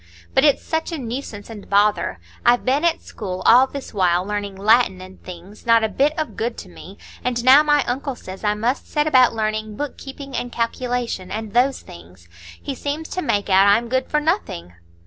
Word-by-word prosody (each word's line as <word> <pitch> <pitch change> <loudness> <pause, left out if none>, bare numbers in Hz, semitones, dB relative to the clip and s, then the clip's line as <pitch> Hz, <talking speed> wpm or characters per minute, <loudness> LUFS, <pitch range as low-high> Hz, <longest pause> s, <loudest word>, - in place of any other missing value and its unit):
But 265 - +3
it's 290 -2 +3
such 320 +1 -2
a 330 - -3
nuisance 235 -4 -6
and 215 -3 -11
bother; 205 - +2 0.3
I've 240 0 +3
been 275 +5 +1
at 340 -1 +1
school 185 -3 -6
all 255 +3 +7
this 280 0 -8
while 180 -2 +2
learning 205 -1 -4
Latin 205 0 +3
and 185 +1 -12
things,—not 205 +6 -1
a 220 - +1
bit 280 +9 +1
of 310 -1 -3
good 230 +1 -3
to 190 - -9
me,—and 235 +6 -6
now 265 +3 +8
my 295 -1 +3
uncle 270 +1 -3
says 190 -3 -10
I 210 0 +1
must 235 +5 -2
set 295 0 0
about 255 -6 +4
learning 215 -1 -2
book 290 +4 -5
keeping 275 0 -9
and 245 - -3
calculation, 235 -4 -3
and 215 +1 -5
those 255 +3 +2
things. 85 +1 -15 0.3
He 280 - -5
seems 290 +4 -4
to 365 - -3
make 205 - -1
out 195 0 +5
I'm 225 +4 +3
good 260 +1 -1
for 300 - +2
nothing." 295 - -2
230 Hz, 195 wpm, -21 LUFS, 200-275 Hz, 0.3 s, now